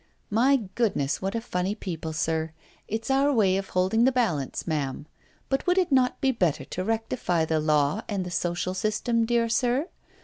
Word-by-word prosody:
My 250 +4 +3
goodness! 190 - 0
what 195 +3 -2
a 230 - -1
funny 185 -2 -2
people, 165 -6 -5
sir! 160 +1 -1 0.3
It 220 +1 -3
's - - -1
our 275 +2 +3
way 205 -8 +3
of 195 0 -3
holding 190 +5 +2
the 260 - +5
balance, 185 - -1
ma'am. 145 -4 -2 0.4
But 270 +5 -1
would 360 +1 +3
it 365 -5 +2
not 255 -2 +3
be 270 - +3
better 180 - 0
to 185 - -4
rectify 220 -6 0
the 160 0 0
law 150 +4 +2
and 195 -3 -2
the 180 - -6
social 175 +1 -1
system, 215 +4 0
dear 235 -1 +2
sir? 250 +7 +1
205 Hz, 190 wpm, -26 LUFS, 170-240 Hz, 0.4 s, the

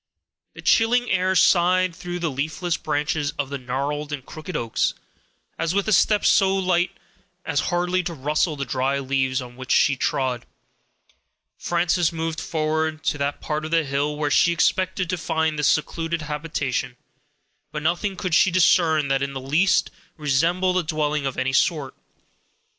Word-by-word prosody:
The - - -11
chilling 245 +2 +3
air 185 0 +1
sighed 180 +1 +3
through 175 0 -5
the 170 -3 -2
leafless 155 +5 -2
branches 150 -1 -2
of 140 -1 -3
the 140 - -3
gnarled 140 +4 -3
and 135 -3 -5
crooked 155 +1 -6
oaks, 115 -1 -1 0.6
as 165 +2 -1
with 200 +1 0
a 215 - +2
step 205 +3 +3
so 195 -2 +4
light 180 -1 +1 0.6
as 145 -3 0
hardly 180 +1 +1
to 170 -2 -4
rustle 150 +3 0
the 140 -1 -4
dry 135 +1 0
leaves 130 -1 -1
on 125 0 -12
which 130 0 -10
she 140 - +4
trod, 130 -2 -1 1.1
Frances 175 -1 +1
moved 165 -1 -3
forward 155 0 -1
to 145 - -1
that 140 +1 -2
part 155 0 -3
of 155 - -4
the 165 0 +2
hill 140 +1 -1
where 150 -1 -1
she 170 - +4
expected 185 +1 +1
to 180 0 -2
find 160 -1 -1
this 150 - +2
secluded 165 +1 0
habitation; 145 -5 -3 0.7
but 150 -1 -5
nothing 175 +5 0
could 185 -2 -4
she 175 - +5
discern 170 -4 +3
that 135 0 +1
in 140 0 -2
the 135 - -4
least 155 +9 +2 0.3
resembled 170 +6 +1
a - - -2
dwelling 150 -3 -1
of 135 - -5
any 130 0 -1
sort. 145 -2 +1
155 Hz, 165 wpm, -23 LUFS, 140-175 Hz, 1.1 s, she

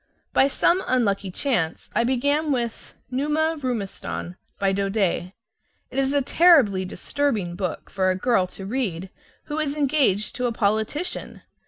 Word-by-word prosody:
By 270 - +5
some 345 +6 +2
unlucky 200 -6 +1
chance 180 - -1
I 235 - +2
began 285 +5 +1
with 240 -4 -3 0.2
"Numa 300 +5 +1
Roumestan," 205 -7 -4 0.2
by 195 -1 +1
Daudet. 195 -2 0 0.6
It 265 - -1
is 270 0 +1
a 285 -1 +2
terribly 260 - +5
disturbing 205 -2 -2
book 185 -2 -4
for 190 -1 +1
a 185 - +2
girl 190 -2 +2
to 190 +1 -9
read 195 -6 -2 0.3
who 295 +1 -4
is 295 -2 -1
engaged 270 -8 +1
to 250 -1 0
a - - -1
politician. 220 - -1
235 Hz, 145 wpm, -24 LUFS, 195-280 Hz, 0.6 s, By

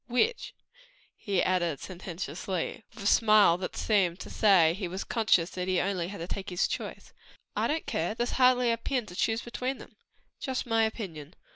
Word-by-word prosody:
"Which?" 340 - 0 0.6
he 195 -3 0
added 175 -5 0
sententiously, 180 0 -4
and - - -16
with 225 - -9
a - - -8
smile 210 -5 +5
that 185 - -5
seemed 190 -5 +1
to - - -8
say, 185 -7 +5
he 190 0 -4
was 185 +3 -4
conscious 205 -7 +2
that 180 0 -4
he 185 - +1
had 180 +2 +1
only 180 -3 -2
to 190 -4 -6
take 195 +1 -5
his 180 -1 +1
choice. - - -6 0.4
"I - - +1
don't 315 +2 -1
care; 175 +7 -2
there's 240 +1 -1
hardly 250 -1 +5
a 230 - 0
pin 245 0 -2
to 180 - -11
choose 225 +4 0
between 255 +2 -3
them." - - -14 0.4
"Just 265 -3 -3
my 225 -2 +3
opinion. 175 -9 -6
200 Hz, 190 wpm, -29 LUFS, 180-230 Hz, 0.6 s, smile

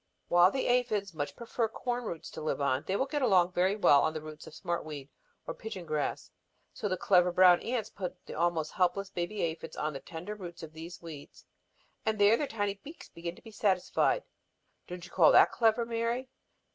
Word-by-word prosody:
While 175 +1 +6
the 265 +5 -2
aphids 215 -6 +1
much 145 -2 -4
prefer 235 0 -2
corn 245 +2 -3
roots 170 -6 -6
to - - -7
live 155 - -1
on, 140 +1 0
they 190 - 0
will 265 - +1
get 290 +1 -2
along 185 -8 +4
very 185 +3 +2
well 145 -9 +5
on 155 0 0
the 155 - -3
roots 155 0 -10
of 155 - -11
smart 170 0 -3
weed 145 -3 -8 0.3
or - - -4
pigeon 215 -5 -7
grass. 155 -2 -2 0.4
So 205 - -3
the 185 - -1
clever 180 -1 +4
little 180 -1 -2
brown 180 -1 +7
ants 225 -3 -2
put 185 -3 -6
the - - -8
almost 165 -1 0
helpless 190 +1 0
baby 180 +4 -3
aphids 165 -1 -4
on 150 0 -2
the 135 - -5
tender 165 +8 -7
roots 175 -5 -9
of 160 -1 -9
these 170 +2 -9
weeds, 155 -4 -11 0.6
and 220 0 0
there 205 +2 +6
their 290 +4 -2
tiny 205 -4 -1
beaks 310 +4 -11
begin 170 +1 -6
to - - -18
be 225 - -11
satisfied. 205 - +1 0.6
Don't 180 0 -7
you - - -14
call - - +6
that - - +7
clever, 230 0 +2
Mary?" 235 +2 -2
180 Hz, 210 wpm, -30 LUFS, 165-220 Hz, 0.6 s, brown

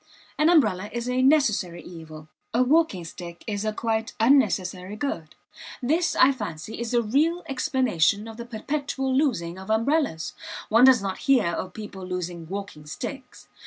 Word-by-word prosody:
An 305 +2 +3
umbrella 210 - +3
is 240 0 -4
a 250 +1 +1
necessary 215 - +2
evil. 155 -3 -11 0.3
A 250 - +4
walking 265 - +2
stick 170 0 -9
is 205 -2 -3
a 215 - 0
quite 220 0 -2
unnecessary 205 -6 +2
good. 190 - -4 0.4
This, 325 +7 +1
I 265 - +6
fancy, 210 - -6
is 235 -1 -3
the 240 0 +2
real 310 +10 +1
explanation 250 - +1
of 225 -1 -9
the 235 - -6
perpetual 265 +3 -2
losing 190 - 0
of 190 +2 -10
umbrellas; 225 - 0 0.4
one 230 +3 +6
does 255 -5 +6
not 190 -1 -3
hear 255 -7 +5
of 180 +2 -4
people 205 -3 -8
losing 180 -2 -5
walking 195 -6 -7
sticks. 250 - -7
220 Hz, 160 wpm, -25 LUFS, 180-265 Hz, 0.4 s, I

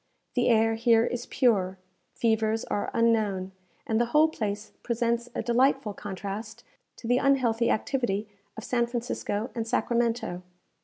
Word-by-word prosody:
The 245 -1 +2
air 225 -1 +4
here 230 0 +4
is 245 0 -4
pure, 195 -7 +2 0.4
fevers 220 -1 +1
are 205 - -2
unknown, 215 -5 +1 0.3
and 220 +1 +1
the 240 - +1
whole 305 +5 +4
place 210 -6 -4
presents 235 0 -1
a - - -2
delightful 255 -1 +2
contrast 205 +4 -6 0.3
to 230 - -9
the 245 +1 +3
unhealthy 245 -4 +2
activity 220 -4 0 0.3
of 220 - -6
San 240 -1 +1
Francisco 235 -1 -3
and 230 -1 -3
Sacramento. 235 -6 0
230 Hz, 140 wpm, -27 LUFS, 215-240 Hz, 0.4 s, air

